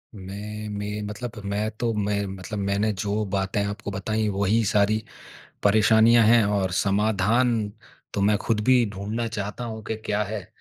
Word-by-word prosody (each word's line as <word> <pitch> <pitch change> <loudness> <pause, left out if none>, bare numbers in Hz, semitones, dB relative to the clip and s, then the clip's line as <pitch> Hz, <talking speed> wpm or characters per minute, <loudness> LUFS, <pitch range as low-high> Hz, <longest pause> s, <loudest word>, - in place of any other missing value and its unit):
मैं 105 +2 -7
में 105 0 -4
मतलब 105 +3 -5 0.2
मैं 105 +2 0
तो 120 -1 +1
मैं 100 -1 -1
मतलब 95 +2 -6
मैंने 100 +2 +1
जो 105 +2 -1
बातें 95 +1 0
आपको 100 0 -5
बताईं 110 +3 -1
वही 100 +3 +1
सारी 105 +1 +3 0.7
परेशानियाँ 110 +3 +5
हैं 115 0 +6
और 100 -2 0
समाधान 105 +4 +2 0.6
तो - - 0
मैं 105 +1 +4
खुद 110 0 0
भी 125 -1 +5
ढूँढ़ना 105 +4 -3
चाहता 105 +2 -4
हूँ 110 -2 -6
कि 110 - -3
क्या 105 -1 -1
है। 105 -2 -5
105 Hz, 160 wpm, -25 LUFS, 100-110 Hz, 0.7 s, हैं